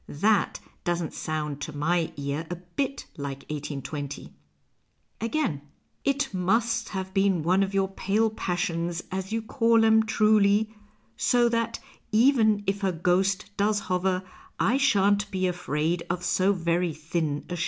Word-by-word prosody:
That 205 +7 +1 0.2
doesn't 175 -2 -1
sound 150 -2 -3
to 145 0 -5
my 165 +2 +1
ear 140 +3 -3
a 175 - -3
bit 180 +11 -4
like 140 -2 -6
1S2(). 145 -1 -5 0.9
Again: 230 - -1 0.2
" - - -44
It 275 -4 -3
must 225 +5 +1
have 190 -1 -5
been 195 -4 +2
one 185 +4 +3
of 195 0 -1
your 195 -1 +2
pale 205 +3 0
passions, 175 -3 -2
as 190 +1 -4
you 225 0 -1
call 230 -1 +3
'em, 220 0 +6
truly 215 -1 +3 0.4
so 240 -1 +3
that 230 -1 -1 0.3
even 220 -3 +4
if 200 +1 -1
her 195 -2 +1
ghost 190 +4 0
dois 205 +1 +2
hover 185 0 0 0.4
I 235 +7 +3
shan't 205 -6 +3
be 185 -2 -1
afraid 170 -1 -1
of 175 +1 -2
so 185 +2 +2
very 170 -2 0
thin 155 -2 -2
a 175 - -4
shade." - - -6
190 Hz, 150 wpm, -26 LUFS, 170-215 Hz, 0.9 s, em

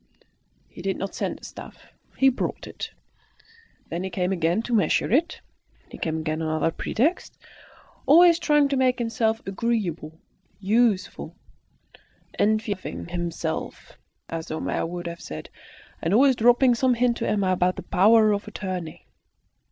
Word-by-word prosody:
He - - -12
did 195 +1 -2
not 195 - -5
send - - -3
the - - -13
stuff; - - -12 0.2
he 270 - +5
brought 260 - -3
it. - - -7 1.0
Then 170 +2 -3
he 190 - -3
came 180 0 -1
again 175 +3 0
to 240 - -4
measure 200 -4 +2
it; 315 +8 +1 0.5
he - - -10
came 160 -1 -2
again 155 0 -2
on 160 - -2
other 155 +1 0
pretexts, 275 - -1 0.7
always 340 +3 +7
trying 295 -3 +3
to 275 - 0
make 255 -1 +2
himself 225 -2 -1
agreeable, 190 -7 -2 0.4
useful, 210 0 0 1.0
"enfeoffing 210 -5 -1
himself," 170 -2 -4 0.3
as 165 -1 -5
Homais 155 - -2
would 175 0 -6
have 170 0 -6
said, 75 - -8 0.5
and 165 +5 +1
always 265 +2 +5
dropping 245 +2 +4
some 250 +1 +2
hint 240 0 +1
to - - -2
Emma 200 -3 +1
about 180 0 +1
the - - -7
power 215 +3 +4
of 205 0 -2
attorney. 185 -6 -6
205 Hz, 145 wpm, -24 LUFS, 175-240 Hz, 1.0 s, always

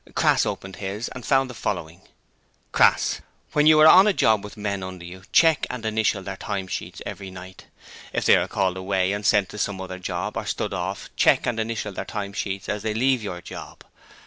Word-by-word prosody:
Crass - - +3
opened 95 0 -5
his 100 +4 -4
and 125 - -9
found 135 +1 +2
the 125 - -8
following: 90 -5 -4 0.7
Crass - - +3 0.3
When 150 0 +4
you 155 -1 +7
are 155 - +9
on 190 +5 +8
a 210 - +4
job 110 - +3
with 105 +1 -10
men 100 -2 -3
under 95 -2 -7
you, 90 +2 -10
check 165 -2 +4
and 125 -3 -5
initial 110 -3 0
their 95 0 -6
time 100 -2 -4
sheets - - -6
every 100 -2 -6
night. 95 0 -11 0.4
If - - -2
they - - +7
are - - +1
called 95 -2 0
away 95 0 0
and 105 +1 -3
sent 105 -2 +3
to 105 - -8
some 100 -2 -2
other 95 0 -6
job, 90 - -4
or - - -4
stood - - -2
off, - - -4
check - - +4
and 120 -2 -1
initial 110 -2 -3
their - - -4
time 100 -2 -5
sheets 100 -2 -4
as 105 0 -2
they 110 0 -2
leave 130 +1 +2
your 90 -4 -5
job. - - -10
100 Hz, 215 wpm, -24 LUFS, 95-110 Hz, 0.7 s, are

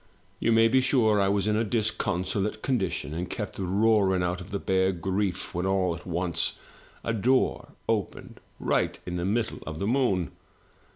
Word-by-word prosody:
You 115 - +2
may 115 0 +6
be 130 +3 +4
sure 110 -6 +3
I 100 - +3
was 100 0 +1
in 105 0 +2
a 110 - +2
disconsolate 105 -2 -1
condition, 95 - -1
and 90 +3 -4
kept - - -5
roaring 95 -1 +2
out 90 0 -1
for 90 - -8
the 100 +2 -4
bare 95 -1 +1
grief, 95 +1 -2
when 90 +2 -1
all 95 -2 +1
at 85 - -12
once 85 -1 -1 0.5
a 115 - -1
door 125 +5 +1
opened - - -2 0.2
right - - 0
in 90 0 -3
the 85 - -2
middle 110 +3 -1
of 80 -1 -5
the 100 - -2
moon! 110 -7 +1
95 Hz, 175 wpm, -27 LUFS, 90-110 Hz, 0.5 s, may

